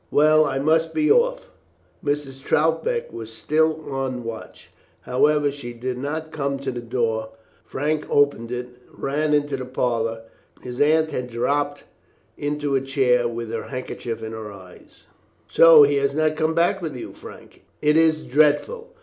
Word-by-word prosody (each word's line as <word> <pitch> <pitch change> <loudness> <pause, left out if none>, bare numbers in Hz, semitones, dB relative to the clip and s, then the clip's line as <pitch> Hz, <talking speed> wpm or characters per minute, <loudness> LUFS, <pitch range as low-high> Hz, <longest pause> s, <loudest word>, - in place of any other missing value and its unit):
Well, 155 +1 +5
I 135 - -2
must 160 +3 +1
be 305 +4 +3
off." - - +2 0.5
Mrs. 145 -2 -3
Troutbeck 165 - 0
was 115 -1 -7
still 155 +5 0
on 135 -2 -3
the 125 - -6
watch. 115 -1 -9 0.3
However, 145 +3 +2
she 130 -4 -8
did 125 +1 -4
not 155 +3 -4
come 140 -2 -2
to 135 -1 -4
the 120 -1 -6
door. 115 -2 -2 0.3
Frank 150 +2 -2
opened 140 -5 +2
it, 125 0 -4 0.2
and - - -21
ran 150 +2 +1
into 145 -1 0
the 130 - -6
parlour. 115 -3 -1 0.4
His 125 -1 -5
Aunt 155 +1 +3
had 125 -3 -4
dropped 145 +5 -1 0.5
into 145 -1 -2
a 135 - +2
chair, 130 -3 +2
with 115 -1 -5
her 115 - -4
handkerchief 125 -3 -5
to 110 - -5
her 110 -1 -7
eyes. 95 -2 -15 0.4
"So 165 -2 +8
he 145 0 +3
has 140 0 0
not 155 0 +1
come 160 +1 0
back 175 +4 +2
with 155 -5 -4
you, - - -8
Frank. - - -13 0.2
It 150 0 +2
is 160 -1 +3
dreadful. 155 - +1
140 Hz, 165 wpm, -23 LUFS, 125-155 Hz, 0.5 s, So